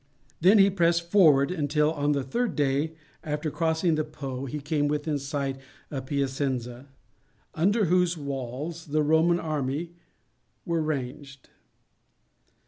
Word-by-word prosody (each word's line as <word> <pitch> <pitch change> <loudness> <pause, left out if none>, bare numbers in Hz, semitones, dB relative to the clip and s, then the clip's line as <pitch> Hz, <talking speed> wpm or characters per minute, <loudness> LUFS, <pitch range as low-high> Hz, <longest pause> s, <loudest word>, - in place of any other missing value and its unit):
Then 190 +6 +6
he 195 0 +6
pressed 170 -2 +1
forward 155 -7 +5
until 150 -2 +1
on 145 -1 +1
the 140 -2 -1
third 235 - -2
day 145 +2 0 0.3
after 150 0 -3
crossing 160 +1 +1
the 155 0 +1
Po 140 -4 -6
he 150 +4 -4
came 145 0 0
within 150 0 -1
sight 140 -1 -3 0.3
of 135 -2 -5
Piacenza, 135 -2 -2 0.7
under 205 +6 +2
whose 180 0 +2
walls 140 +4 -5
the 155 +1 +1
Roman 160 +3 +3
army 155 +1 -3 0.7
were 170 -1 0
ranged. 140 -2 -5
150 Hz, 130 wpm, -27 LUFS, 140-165 Hz, 0.7 s, Then